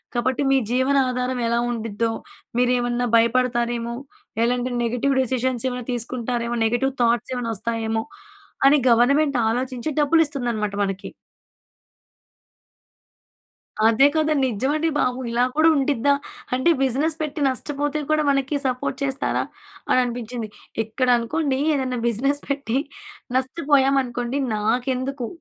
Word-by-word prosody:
కాబట్టి 245 +3 0
మీ 270 - +5
జీవన 260 +3 +2
ఆనాధారం 250 0 -2
ఎలా 235 +1 +1
ఉండిద్దో 225 -1 -2 0.5
మీరు 250 0 +3
ఏమన్నా 245 0 -1
భయపడతారేమో, 235 0 +1 0.5
ఎలాంటి 245 +1 0
నెగెటివ్ 245 +4 0
డెసిసన్స్ 255 -1 -1
ఏమైనా 250 -1 -5
తీసుకుంటారేమో, 240 0 -2
నెగెటివ్ 240 +4 +1
థాట్స్ 235 +2 +1
ఏమైనా 240 -2 -2
వస్తాయేమో, 225 +1 -2 0.6
అని 280 +2 +7
గవర్నమెంట్ 275 +4 +3
ఆలోచించి 250 +3 -2
డబ్బులు 325 +3 +4
ఇస్తుందన్నమాట 240 -8 -2
మనకి. 195 -1 -4 2.8
అదే 230 +5 +5
కదా 310 0 +2
నిజమండి 265 +7 0
బాబు. 250 0 +1
ఇలా 240 +1 +2
కూడా 315 +1 +5
ఉండిద్దా, 280 -1 +2 0.4
అంటే 260 +7 +3
బిజినెస్ 280 +5 +1
పెట్టి 300 0 -4
నష్టపోతే 290 +3 -2
కూడా 310 0 +3
మనకి 275 +1 0
సపోర్ట్ 255 +1 -2
చేస్తారా? 270 -1 -1 0.5
అని - - +4
అనిపించింది. 240 -2 -5 0.4
ఇక్కడ 250 +4 -2
అనుకోండి 265 +3 -1 0.2
ఏదైనా 255 -3 -1
బిజినెస్ 275 +6 0
పెట్టి 275 -4 -1 0.6
నష్టపోయామనుకోండి, 265 -2 +1 0.2
నాకెందుకు 250 +4 -1
250 Hz, 115 wpm, -22 LUFS, 235-275 Hz, 2.8 s, అని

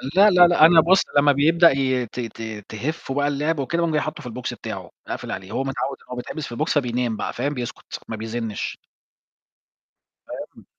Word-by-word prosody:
لا، 205 +2 +7
لا، 180 -2 +7
لأ، 170 -3 +6
أنا 165 -1 +7
بُص 185 +4 +4 0.2
لما 145 0 +6
بيبدأ 165 +5 +5
ي 130 -2 0
ت 120 - -9
ت 110 -3 -6
تهِفُّه 135 +5 -4
بقى 145 +1 +1
اللعب 145 +2 -1
وكده 155 +5 -1
باقوم 170 - +1
جاي 150 - +2
حاطه 155 -1 -5
في 125 - -6
الbox 125 +2 -5
بتاعه - - -7 0.2
أقفل - - -5
عليه، 95 +2 -6
هو 135 - -1
متعود 135 0 -3
إنه - - -18
هو 125 - -4
بيتحبس 140 +4 -5
في 120 - -7
الbox 150 +2 0
بينام 120 -3 -1
بقى، - - -3
فاهم؟ 145 +1 -2
بيسكُت 120 -3 -6
ما 110 - -4
بيزنِّش. 110 0 -4 1.5
فاهم، - - -9
135 Hz, 200 wpm, -23 LUFS, 120-155 Hz, 1.5 s, لا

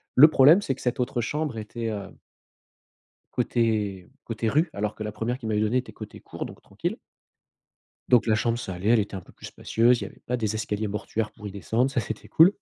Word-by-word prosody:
Le 150 +4 +10
problème, 155 +6 +6
c'est 135 -9 -1
que - - -13
cette 125 0 -1
autre 125 -1 0
chambre 145 0 -2
était, 115 +2 -5
heu 100 -2 -5 1.2
côté 105 -6 0
côté 115 0 -2
rue, 155 +6 +2
alors 105 +1 -2
que 110 - -5
la 105 - -4
1re 120 +4 -2
qu'ils 110 - -5
m'avaient 105 -1 +1
donnée 110 +4 +1
était 125 - -5
côté - - -9
cour, - - -6
donc - - -11
tranquille. - - -4 1.1
Donc 120 -2 +5
la 110 - +4
chambre, 115 +1 +1
ça 95 -6 -5
allait, 95 +4 -3
elle 120 -1 +6
était 100 0 -4
un - - -5
peu - - -18
plus - - -11
spacieuse, 120 +2 +2
il - - -3
y - - -4
avait - - -15
pas 125 - 0
des 110 -2 -1
escaliers 105 -1 -2
mortuaires 105 +1 -3
pour 105 -2 -10
y - - -4
descendre, 115 +7 0
ça 135 -3 0
c'était 110 0 -6
cool, 165 +3 +7
115 Hz, 230 wpm, -26 LUFS, 105-125 Hz, 1.2 s, Le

